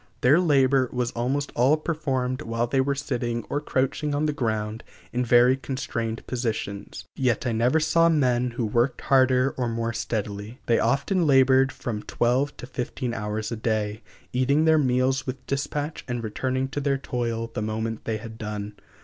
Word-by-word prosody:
Their 140 Hz, +7 st, +5 dB
labor 135 Hz, -6 st, +3 dB
was 125 Hz, -1 st, -1 dB
almost 135 Hz, +4 st, -1 dB
all 130 Hz, +6 st, +4 dB
performed 135 Hz, -5 st, -2 dB
while 115 Hz, -3 st, -1 dB
they 130 Hz, +3 st, +1 dB
were 140 Hz, +1 st, 0 dB
sitting 120 Hz, -4 st, -2 dB
or 145 Hz, -, 0 dB
crouching 145 Hz, +1 st, -1 dB
on 150 Hz, +2 st, +1 dB
the 150 Hz, -, 0 dB
ground 110 Hz, -3 st, -2 dB, 0.3 s
in 125 Hz, +1 st, +1 dB
very 120 Hz, +2 st, +5 dB
constrained 115 Hz, -4 st, -4 dB
positions; 110 Hz, -5 st, -4 dB
yet 125 Hz, -3 st, 0 dB
I 125 Hz, -, +1 dB
never 120 Hz, +7 st, +2 dB
saw 165 Hz, +2 st, +4 dB
men 125 Hz, -6 st, +2 dB
who 120 Hz, -, 0 dB
worked 120 Hz, +4 st, +1 dB
harder 130 Hz, 0 st, +3 dB
or 125 Hz, -2 st, 0 dB
more 115 Hz, 0 st, -2 dB
steadily. 110 Hz, 0 st, -4 dB
They 115 Hz, -, +3 dB
often 160 Hz, +5 st, +1 dB
labored 135 Hz, -1 st, +5 dB
from 110 Hz, -3 st, -4 dB
twelve 130 Hz, +7 st, 0 dB
to -, -, -7 dB
fifteen 125 Hz, 0 st, -4 dB
hours 105 Hz, 0 st, -3 dB
a -, -, -1 dB
day, 110 Hz, -1 st, -1 dB, 0.3 s
eating 140 Hz, +5 st, +2 dB
their 160 Hz, -1 st, +5 dB
meals 130 Hz, 0 st, +1 dB
with 130 Hz, 0 st, -5 dB
dispatch 145 Hz, +3 st, -3 dB
and 120 Hz, -2 st, -3 dB
returning 130 Hz, +4 st, -1 dB
to 145 Hz, +1 st, -3 dB
their 140 Hz, -1 st, +1 dB
toil 115 Hz, -3 st, -3 dB
the -, -, -3 dB
moment 110 Hz, +1 st, -3 dB
they 110 Hz, -1 st, -1 dB
had 110 Hz, 0 st, -10 dB
done. 105 Hz, -1 st, -5 dB
125 Hz, 175 wpm, -25 LUFS, 115-135 Hz, 0.3 s, Their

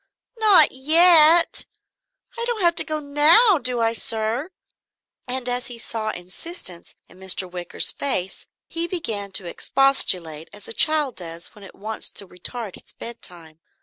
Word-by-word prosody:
"Not 425 Hz, -4 st, +6 dB
yet? 325 Hz, +4 st, +5 dB, 0.7 s
I 470 Hz, -, -3 dB
don't 475 Hz, -3 st, -3 dB
have 340 Hz, -1 st, +3 dB
to -, -, +6 dB
go 310 Hz, -1 st, -3 dB
now, 305 Hz, +8 st, +5 dB
do 250 Hz, -3 st, -1 dB
I, 225 Hz, 0 st, +1 dB
sir?" 230 Hz, +6 st, -1 dB, 0.8 s
And 250 Hz, 0 st, -3 dB
as 245 Hz, 0 st, -3 dB
he 245 Hz, -, -10 dB
saw 225 Hz, -1 st, -5 dB
insistence 185 Hz, -, -7 dB
in 180 Hz, -, -20 dB
Mr. 190 Hz, 0 st, +1 dB
Wicker's 180 Hz, -1 st, -3 dB
face 195 Hz, -10 st, -1 dB, 0.2 s
he 335 Hz, 0 st, -2 dB
began 220 Hz, -, -5 dB
to 190 Hz, -, 0 dB
expostulate 175 Hz, -, +1 dB
as 205 Hz, -1 st, -10 dB
a -, -, -4 dB
child 300 Hz, -2 st, +1 dB
does 170 Hz, -1 st, -7 dB
when 210 Hz, -, -16 dB
it 195 Hz, -, -14 dB
wants 215 Hz, +2 st, -6 dB
to 200 Hz, -, 0 dB
retard 200 Hz, +4 st, -7 dB
its -, -, -17 dB
bedtime. 175 Hz, -9 st, -8 dB
235 Hz, 150 wpm, -21 LUFS, 190-310 Hz, 0.8 s, Not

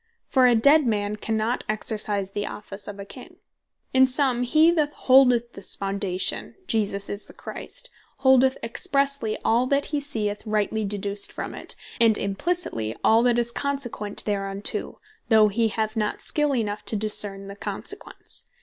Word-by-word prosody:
For 255 Hz, -2 st, +4 dB
a 245 Hz, -, +4 dB
dead 280 Hz, +5 st, +5 dB
man 205 Hz, -2 st, -1 dB
cannot 220 Hz, +3 st, -2 dB
exercise 210 Hz, -2 st, +1 dB
the 205 Hz, +1 st, -3 dB
Office 205 Hz, -1 st, -7 dB
of 205 Hz, -, -7 dB
a 200 Hz, -, -7 dB
King. -, -, -12 dB, 0.6 s
In 260 Hz, 0 st, +6 dB
summe, 255 Hz, -2 st, +2 dB
he 310 Hz, +7 st, +4 dB
that 305 Hz, -3 st, +1 dB
holdeth 250 Hz, -2 st, +4 dB
this 195 Hz, -, -3 dB
Foundation, 195 Hz, -2 st, -2 dB
Jesus 200 Hz, -, -1 dB
Is 205 Hz, +1 st, -4 dB
The -, -, -14 dB
Christ, -, -, -6 dB, 0.3 s
holdeth 265 Hz, 0 st, +4 dB
Expressely 275 Hz, -1 st, 0 dB
all 240 Hz, +3 st, +3 dB
that 280 Hz, +1 st, +1 dB
hee 295 Hz, -, +2 dB
seeth 215 Hz, -8 st, -2 dB
rightly 215 Hz, 0 st, -1 dB
deduced 200 Hz, 0 st, -1 dB
from -, -, -6 dB
it, -, -, -4 dB, 0.2 s
and 225 Hz, -2 st, +4 dB
Implicitely 200 Hz, -, -2 dB
all 225 Hz, +1 st, +5 dB
that 240 Hz, -1 st, +2 dB
is 235 Hz, 0 st, +1 dB
consequent 255 Hz, -7 st, -2 dB
thereunto, 200 Hz, -1 st, -1 dB, 0.3 s
though 215 Hz, -2 st, +6 dB
he 225 Hz, +3 st, +1 dB
have 220 Hz, +1 st, -2 dB
not 210 Hz, -1 st, -1 dB
skill 295 Hz, -2 st, +1 dB
enough 210 Hz, -3 st, -2 dB
to -, -, +2 dB
discern 205 Hz, -2 st, 0 dB
the 200 Hz, 0 st, -9 dB
consequence. -, -, -4 dB
220 Hz, 160 wpm, -24 LUFS, 205-260 Hz, 0.6 s, In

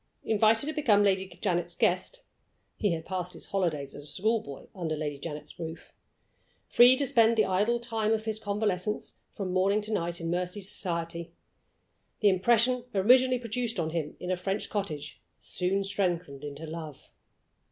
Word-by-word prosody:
Invited 220 Hz, +3 st, +3 dB
to 310 Hz, -, -2 dB
become 220 Hz, -10 st, +4 dB
Lady 190 Hz, -1 st, +2 dB
Janet's 175 Hz, -2 st, -2 dB
guest 190 Hz, -, 0 dB, 0.5 s
(he 205 Hz, -5 st, +1 dB
had 160 Hz, -1 st, -5 dB
passed 180 Hz, -1 st, -3 dB
his -, -, -5 dB
holidays 155 Hz, -8 st, -1 dB
as 145 Hz, -, -6 dB
a -, -, -3 dB
school 220 Hz, +9 st, 0 dB
boy 140 Hz, -1 st, -10 dB
under 165 Hz, -4 st, -3 dB
Lady 150 Hz, -2 st, -4 dB
Janet's 150 Hz, -1 st, -7 dB
roof) 165 Hz, 0 st, -7 dB, 0.7 s
free 245 Hz, +2 st, +7 dB
to 280 Hz, -, +1 dB
spend 230 Hz, -2 st, +4 dB
the 215 Hz, -, +4 dB
idle 210 Hz, +6 st, +1 dB
time 225 Hz, -2 st, -1 dB
of 220 Hz, -1 st, 0 dB
his 220 Hz, -1 st, -1 dB
convalescence 205 Hz, -1 st, -2 dB, 0.2 s
from 190 Hz, -3 st, -3 dB
morning 195 Hz, +3 st, +3 dB
to 215 Hz, +1 st, -3 dB
night 170 Hz, -3 st, -2 dB
in 165 Hz, 0 st, -3 dB
Mercy's 180 Hz, +2 st, -1 dB
society 170 Hz, -3 st, -3 dB, 0.9 s
the 210 Hz, -, +5 dB
impression 235 Hz, +6 st, +3 dB
originally 250 Hz, +6 st, +5 dB
produced 235 Hz, -2 st, -3 dB
on 160 Hz, -1 st, -1 dB
him 155 Hz, -3 st, -3 dB
in 180 Hz, -, -3 dB
a -, -, +2 dB
French 195 Hz, +3 st, -3 dB
cottage 155 Hz, -8 st, -4 dB, 0.2 s
soon 190 Hz, +2 st, -1 dB
strengthened 180 Hz, -7 st, -1 dB
into 145 Hz, +2 st, -6 dB
love. 155 Hz, -3 st, -8 dB
190 Hz, 165 wpm, -29 LUFS, 170-220 Hz, 0.9 s, free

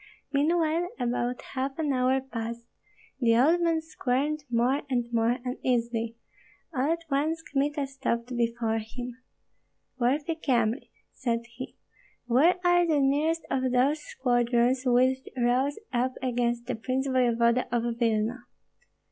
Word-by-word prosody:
Meanwhile 325 Hz, +3 st, +2 dB
about 245 Hz, 0 st, -1 dB
half 270 Hz, 0 st, -2 dB
an 300 Hz, -4 st, 0 dB
hour 260 Hz, +1 st, +2 dB
passed; 235 Hz, -2 st, -6 dB, 0.5 s
the 230 Hz, -3 st, +4 dB
old 320 Hz, +8 st, +4 dB
man 330 Hz, -1 st, +2 dB
squirmed 295 Hz, 0 st, -1 dB
more 245 Hz, +4 st, +2 dB
and 245 Hz, -2 st, +1 dB
more 230 Hz, +1 st, +2 dB
uneasily. 235 Hz, -2 st, -1 dB, 0.6 s
All 275 Hz, +3 st, +1 dB
at 335 Hz, 0 st, -2 dB
once 315 Hz, +4 st, 0 dB
Kmita 290 Hz, 0 st, -1 dB
stopped 250 Hz, -2 st, -3 dB
before 230 Hz, -1 st, 0 dB
him. 245 Hz, +3 st, -7 dB, 0.8 s
"Worthy 285 Hz, +6 st, +1 dB
Kyemlich," 245 Hz, -5 st, 0 dB, 0.2 s
said 235 Hz, -3 st, -1 dB
he, 245 Hz, +2 st, -9 dB, 0.5 s
"where 270 Hz, +9 st, +4 dB
are 350 Hz, 0 st, +4 dB
the 305 Hz, -3 st, +3 dB
nearest 295 Hz, +4 st, +1 dB
of 260 Hz, -1 st, +1 dB
those 270 Hz, +5 st, +3 dB
squadrons 245 Hz, -2 st, +1 dB
which 255 Hz, +2 st, +4 dB, 0.2 s
rose 255 Hz, +4 st, +1 dB, 0.2 s
up 250 Hz, +2 st, +1 dB
against 240 Hz, -1 st, 0 dB
the 250 Hz, -, -2 dB
prince 255 Hz, +4 st, -2 dB
voevoda 240 Hz, -2 st, +2 dB
of 240 Hz, -1 st, +1 dB, 0.2 s
Vilna?" 230 Hz, +1 st, 0 dB
255 Hz, 130 wpm, -28 LUFS, 240-285 Hz, 0.8 s, the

